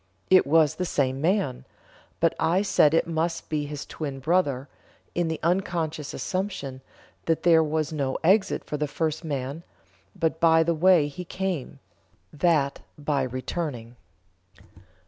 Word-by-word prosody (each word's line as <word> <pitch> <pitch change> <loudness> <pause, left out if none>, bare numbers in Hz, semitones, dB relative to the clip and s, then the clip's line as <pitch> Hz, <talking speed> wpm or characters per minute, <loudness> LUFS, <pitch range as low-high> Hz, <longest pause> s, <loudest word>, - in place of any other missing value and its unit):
It 185 -6 +6
was 155 -1 +4
the 185 - -3
same 135 -4 0
man; 165 -7 0 0.6
but 165 -1 +3
I 170 +5 +2
said 165 -6 +4
it - - +3
must 165 0 -2
be 150 -2 -1
his 145 0 -6
twin 140 -4 -5
brother, 140 -3 +1 0.5
in 175 -1 0
the 160 0 -3
unconscious 165 -4 -1
assumption 185 -9 -4 0.4
that 165 -1 0
there 165 -2 +6
was 155 0 -1
no 140 -3 -1
exit 190 +4 +3
for 150 - -4
the 150 0 -1
first 155 +2 -2
man 140 0 -4 0.5
but 160 -3 -1
by 165 -1 +5
the 170 +1 +1
way 170 -2 +4
he 145 +5 -7
came 185 -5 -4 0.6
(that 150 -3 +1 0.2
by 145 -1 0
returning)." 130 -1 -4
160 Hz, 145 wpm, -26 LUFS, 145-170 Hz, 0.6 s, It